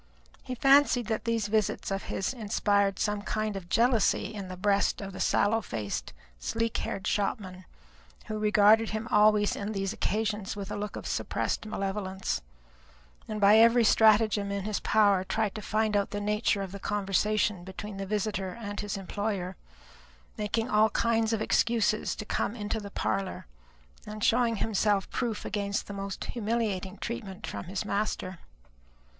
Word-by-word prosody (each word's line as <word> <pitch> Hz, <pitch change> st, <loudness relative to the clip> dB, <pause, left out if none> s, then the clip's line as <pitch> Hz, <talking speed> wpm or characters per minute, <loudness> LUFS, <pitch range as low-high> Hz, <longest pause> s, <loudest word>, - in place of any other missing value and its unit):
He 255 Hz, -, -5 dB
fancied 270 Hz, -1 st, +5 dB
that 220 Hz, +2 st, -2 dB
these 230 Hz, -2 st, 0 dB
visits 215 Hz, -2 st, 0 dB
of 195 Hz, 0 st, -2 dB
his 195 Hz, -, -2 dB
inspired 205 Hz, -4 st, +1 dB
some 210 Hz, -1 st, -1 dB
kind 215 Hz, 0 st, -2 dB
of 180 Hz, -3 st, -7 dB
jealousy 230 Hz, -2 st, +2 dB
in 200 Hz, -3 st, -6 dB
the 185 Hz, 0 st, -7 dB
breast 200 Hz, +1 st, +1 dB
of 195 Hz, -1 st, -6 dB
the -, -, -8 dB
sallow 225 Hz, +2 st, +2 dB
faced, 105 Hz, -, -4 dB, 0.3 s
sleek 230 Hz, -, -2 dB
haired 190 Hz, -, -4 dB
shopman; 190 Hz, -3 st, -2 dB, 0.6 s
who 215 Hz, 0 st, -4 dB
regarded 215 Hz, +1 st, +5 dB
him 220 Hz, +2 st, -3 dB
always 210 Hz, -1 st, +4 dB
on 205 Hz, +2 st, -4 dB
these 195 Hz, -1 st, -2 dB
occasions 210 Hz, -2 st, -2 dB
with 200 Hz, -1 st, -6 dB
a -, -, -2 dB
look 205 Hz, 0 st, -4 dB
of -, -, -7 dB
suppressed -, -, -2 dB
malevolence, 195 Hz, -2 st, -3 dB, 0.9 s
and 215 Hz, -1 st, -4 dB
by 210 Hz, +2 st, +7 dB
every 230 Hz, +1 st, +6 dB
stratagem 215 Hz, -2 st, +4 dB
in 200 Hz, -1 st, -2 dB
his 210 Hz, -1 st, -2 dB
power 205 Hz, -3 st, +3 dB
tried 215 Hz, +1 st, -1 dB
to 215 Hz, -, -6 dB
find 215 Hz, +1 st, 0 dB
out 200 Hz, -1 st, +1 dB
the 205 Hz, -, -3 dB
nature 210 Hz, 0 st, 0 dB
of 190 Hz, -, -7 dB
the 200 Hz, -, -7 dB
conversation 205 Hz, -1 st, 0 dB
between 195 Hz, +2 st, -7 dB
the 195 Hz, 0 st, -4 dB
visitor 205 Hz, -1 st, -2 dB
and 205 Hz, -2 st, -5 dB
his 205 Hz, -1 st, -3 dB
employer, 195 Hz, -1 st, -3 dB, 0.8 s
making 215 Hz, +2 st, -1 dB
all 215 Hz, -2 st, +4 dB
kinds 225 Hz, 0 st, +1 dB
of 220 Hz, -1 st, 0 dB
excuses 225 Hz, -2 st, +1 dB
to 215 Hz, -, -6 dB
come 210 Hz, -, -1 dB
into 215 Hz, 0 st, -3 dB
the 205 Hz, -1 st, -8 dB
parlour, 105 Hz, -, -2 dB, 0.6 s
and 210 Hz, 0 st, -6 dB
showing 235 Hz, -1 st, +3 dB
himself 205 Hz, -2 st, +1 dB
proof 235 Hz, -4 st, -2 dB
against 200 Hz, 0 st, -2 dB
the 205 Hz, -, -7 dB
most 195 Hz, -1 st, -5 dB
humiliating 210 Hz, -4 st, -2 dB
treatment 210 Hz, -4 st, -6 dB
from -, -, -6 dB
his 190 Hz, +3 st, -4 dB
master. 200 Hz, -3 st, -2 dB
210 Hz, 160 wpm, -29 LUFS, 195-220 Hz, 0.9 s, by